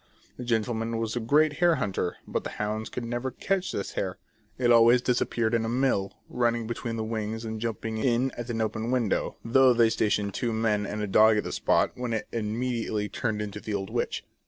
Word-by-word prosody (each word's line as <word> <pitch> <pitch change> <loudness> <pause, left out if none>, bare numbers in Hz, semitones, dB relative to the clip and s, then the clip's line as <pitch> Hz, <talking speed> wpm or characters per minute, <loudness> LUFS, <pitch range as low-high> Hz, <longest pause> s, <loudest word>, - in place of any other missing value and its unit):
The 125 - -6
gentle 120 -1 0
man 115 +1 -2
was 115 0 -2
a - - 0
great 145 +6 +3
hare 175 -2 +5
hunter, 95 - -2
but - - -2
the - - -4
hounds 105 +1 -2
could 120 - -5
never 120 +2 -2
catch 190 +8 -1
this 100 - -3
hare; 95 -1 -3 0.4
it 120 -1 +3
always 120 +1 +7
disappeared 120 -2 0
in 115 -1 +2
a 115 - -2
mill, 120 -6 +1 0.2
running 120 -1 0
between 115 0 -4
the 110 - -2
wings 110 0 -3
and 110 -1 -5
jumping 115 -1 -3
in 125 +2 +2
at 120 0 -7
an 115 -1 -1
open 110 +1 -2
window, 125 -5 0
though 130 +2 +5
they 115 -1 +4
stationed 105 -2 0
two 120 +3 -1
men 110 -2 +1
and 105 +1 -3
a - - -1
dog 110 +2 +5
at 105 - 0
the - - -5
spot, - - +2
when 125 -2 -3
it 110 - -2
immediately 110 -1 -2
turned 110 -4 -2
into 105 0 -6
the 105 0 -4
old 95 -1 -4
witch. - - -2
115 Hz, 215 wpm, -27 LUFS, 110-120 Hz, 0.4 s, always